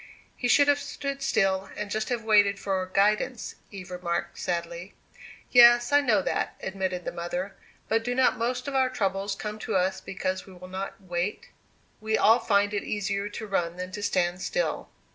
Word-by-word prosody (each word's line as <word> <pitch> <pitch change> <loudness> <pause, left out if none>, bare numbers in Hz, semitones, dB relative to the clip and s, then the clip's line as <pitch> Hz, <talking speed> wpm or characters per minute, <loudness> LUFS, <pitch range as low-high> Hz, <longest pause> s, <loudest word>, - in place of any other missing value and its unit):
"He 245 - -2
should 285 +3 +5
have 290 0 +4
stood 275 -1 -5
still, 195 -7 +1
and 210 -1 -4
just 215 0 -2
have 240 -2 -2
waited 205 -2 +4
for 190 -2 -2
guidance," 210 +5 +1 0.2
Eve 190 -2 -9
remarked, 175 -1 -3
sadly. 170 +1 -4 0.6
"Yes, 240 0 +7
I 290 0 +6
know 215 -8 +2
that," - - -1
admitted 190 -2 -3
the - - -2
mother. 175 +3 -4 0.3
"But 225 +1 +1
do 245 +1 -2
not 260 0 +3
most 245 +2 -2
of 280 - -3
our 260 -1 +3
troubles 195 -3 -1
come 210 +1 -6
to - - -3
us 190 0 +1
because 185 0 -4
we 190 - -12
will 180 0 -11
not 190 +1 -5
wait? 180 +1 -3 0.5
We 220 0 0
all 225 +2 +5
find 205 -2 +2
it 205 - 0
easier 200 0 -2
to 220 +1 -6
run 175 -4 -1
than 185 0 -5
to 205 - -6
stand 180 -2 0
still." - - -2
200 Hz, 185 wpm, -27 LUFS, 185-230 Hz, 0.6 s, Yes